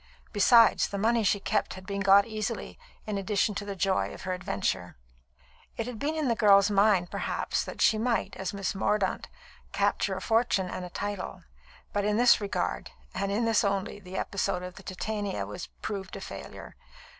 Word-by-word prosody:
Besides, 230 +3 +6
the 200 - -5
money 225 +3 +2
she 205 0 +2
kept 205 +1 -1
had 185 0 -11
been 200 +1 -3
got 195 +1 +6
easily, 220 -1 -4 0.3
in 210 -2 -2
addition 205 +2 0
to 205 +1 -4
the 200 -1 -5
joy 190 0 0
of - - -11
her 185 - -2
adventure. 95 - -2 0.8
It 230 - -2
had 245 -3 -6
been 300 +3 -1
in 310 -3 0
the 235 - +3
girl's 200 -1 +5
mind, 195 -3 +3
perhaps, - - -1
that - - -2
she 215 - +4
might, 230 -2 0
as 190 -1 -3
Miss 200 -1 -2
Mordaunt, 195 0 0 0.5
capture - - +1
a - - -5
fortune 225 -5 +1
and 185 - -5
a 180 - -6
title; 190 -1 -5 0.5
but 205 - 0
in 210 +1 +1
this 245 -2 +5
regard, 130 - -2 0.2
and 200 - -2 0.2
this 225 +1 +3
only, 200 0 -1
the 190 -1 -8
episode 180 -2 -1
of 180 0 -7
the - - -12
Titania 200 - -3
had 105 +1 -7 0.2
proved 195 -3 -4
a - - -7
failure. - - -9
200 Hz, 185 wpm, -28 LUFS, 190-215 Hz, 0.8 s, Besides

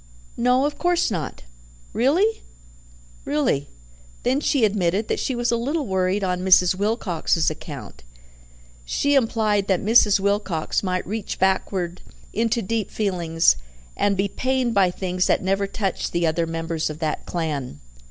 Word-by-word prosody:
"No, 250 +3 +2
of 290 0 -3
course 350 -6 +2
not." 170 -6 -4 0.5
"Really?" 350 - +2 0.8
"Really." 145 - 0 0.5
Then 260 +3 +2
she 280 -5 +2
admitted 200 0 0
that - - 0
she 260 - -1
was 240 0 0
a - - +2
little 285 +6 -1
worried 190 0 0
on 180 -1 -1
Mrs. 185 -1 +5
Wilcox's 185 -6 0
account; 140 - -9 0.8
she 285 - 0
implied 220 -6 +2
that 190 -3 +2
Mrs. 210 -2 +5
Wilcox 195 -5 0
might 185 -2 -2
reach 215 +1 -4
backward 185 -2 0 0.3
into 230 +2 0
deep 220 +1 -2
feelings, 170 - +1 0.4
and 200 -1 +1
be 195 +1 +1
pained 255 +2 -1
by 195 -3 +4
things 180 0 -1
that - - +2
never 195 +1 0
touched 195 -1 -3
the 170 0 +1
other 165 +1 0
members 165 -1 -2
of 155 - -6
that 155 -2 -3
clan. 150 - -3
195 Hz, 145 wpm, -23 LUFS, 170-230 Hz, 0.8 s, Mrs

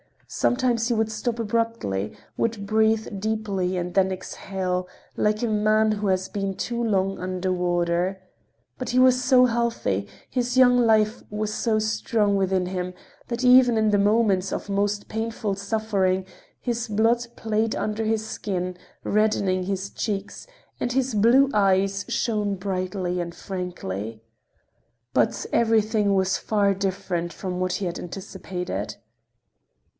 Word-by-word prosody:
Sometimes 245 -2 +1
he 245 - +1
would 220 -1 0
stop 230 +2 -2
abruptly, 225 - -1 0.2
would 225 -3 -1
breathe 220 -1 +1
deeply 200 -4 -1
and 175 0 -3
then 190 -1 +3
exhale 185 0 -3 0.3
like 210 +2 +1
a - - +2
man 215 0 +3
who 210 -1 -1
has 190 0 0
been 195 -2 -3
too 235 +3 -3
long 195 -4 0
under 185 0 -2
water. 175 +1 0 0.6
But 255 - -3
he 250 - 0
was 255 0 +5
so 255 -1 +6
healthy, 230 - 0 0.2
his 250 0 -1
young 250 -1 +6
life 220 -2 +3
was 210 0 -2
so 220 0 +1
strong 215 -1 +1
within 190 -1 +1
him, 180 -1 -3 0.3
that 235 +1 -3
even 250 -2 +6
in 220 -1 +3
the 205 - +4
moments 200 -3 +2
of - - -4
most 205 +1 -1
painful 220 -2 -2
suffering 200 -2 0 0.4
his 240 -1 -2
blood 230 +3 +2
played 220 0 0
under 215 +1 -2
his 220 0 0
skin, 185 -4 -3 0.3
reddening 200 -3 +1
his 195 +1 -3
cheeks, 200 - -4 0.3
and 245 - -1
his 265 -1 0
blue 245 +6 +5
eyes 195 -1 +2
shone 210 -3 0
brightly 185 -1 -2
and 170 -1 -4
frankly. 115 - -5 0.9
But 120 - +1
everything 220 -3 +2
was 190 0 +2
far 205 -2 +1
different 185 -3 -2
from 180 -2 -4
what 185 0 0
he 190 +2 -2
had 175 -1 -3
anticipated. 180 - -5
205 Hz, 140 wpm, -24 LUFS, 185-225 Hz, 0.9 s, so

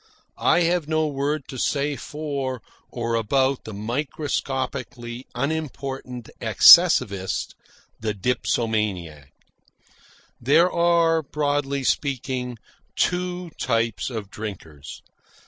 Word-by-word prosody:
I - - +3
have 170 -2 +1
no 155 0 +1
word 145 0 -1
to 130 - -6
say 145 +2 0
for 135 0 -4 0.3
or 115 -1 -3
about 130 +4 +1
the 110 - -7
microscopically 125 0 -4
unimportant 135 -3 -4
excessivist, 95 -1 +6 0.5
the 110 -1 -2
dipsomaniac. 105 - -1 1.1
There 160 +9 +4
are, 170 -1 +3
broadly 145 -1 -1
speaking, 130 -3 -1 0.4
two 180 -1 -1
types 115 -1 0
of 110 -5 -6
drinkers. 80 -9 -8
130 Hz, 90 wpm, -23 LUFS, 115-150 Hz, 1.1 s, excessivist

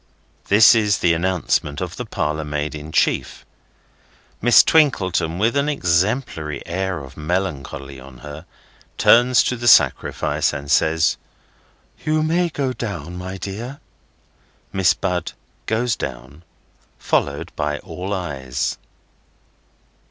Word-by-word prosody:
This 105 +4 +7
is 105 -4 +2
the 85 - +2
announcement 85 -4 -1
of 90 -2 -5
the 125 - -6
parlour 75 -4 -2
maid 75 0 -3
in 75 +1 -8
chief. - - 0 1.0
Miss 120 +2 +7
Twinkleton, 95 - +2
with 115 +7 +1
an 140 +1 +1
exemplary 90 - -1
air 95 +2 -2
of 65 -1 -12
melancholy 75 -5 -4
on 65 0 -13
her, 75 +3 -9 0.5
turns 120 +1 +5
to 125 - -1
the 120 0 -4
sacrifice, 110 - +3
and 70 -1 -5
says, 80 0 +2 0.9
"You 155 0 +1
may 170 +2 +1
go 135 -4 -2
down, 90 - -6
my 95 +1 -6
dear." 115 +9 -6 0.9
Miss 95 -1 +3
Bud 90 -2 -3 0.3
goes 115 0 0
down, 65 +4 -7 0.6
followed 70 0 -1
by 75 0 -2
all 90 +3 -7
eyes. 70 -10 -3
90 Hz, 120 wpm, -21 LUFS, 75-115 Hz, 1.0 s, This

